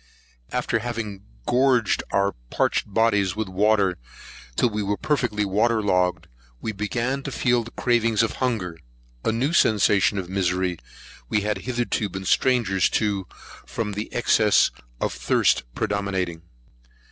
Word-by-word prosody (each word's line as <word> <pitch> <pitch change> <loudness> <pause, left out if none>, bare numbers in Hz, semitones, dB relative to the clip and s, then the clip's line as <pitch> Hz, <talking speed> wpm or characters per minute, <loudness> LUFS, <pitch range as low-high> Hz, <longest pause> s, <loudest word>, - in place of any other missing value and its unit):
After 125 -2 0
having 110 -4 -5 0.2
gorged 125 -3 +3
our 100 0 +2 0.2
parched 105 - 0
bodies 105 -3 +2
with 110 -1 -2
water, 100 -1 +2 0.6
till 120 - +2
we 105 0 -2
were 100 0 -1
perfectly 115 -6 0
water 110 +4 +2
logged, 90 -3 +1 0.3
we 110 - -3
began 115 +6 -2
to 135 - -6
feel 125 -1 +2
the 115 - -9
cravings 115 -2 +1
of 115 - -2
hunger; 105 -10 -2 0.4
a - - +1
new 130 +8 0
sensation 105 - +3
of 95 -2 -3
misery 90 -2 -1 0.5
we 105 - +1
had 105 +1 -1
hitherto 120 -4 -1
been 95 +1 -6
strangers 105 -6 +2
to, 100 -4 -1 0.4
from 110 -3 -3
the 105 +2 -5
excess 110 -3 +3 0.3
of - - -1
thirst 60 +1 +2
predominating. 95 -5 -2
105 Hz, 135 wpm, -24 LUFS, 95-115 Hz, 0.6 s, gorged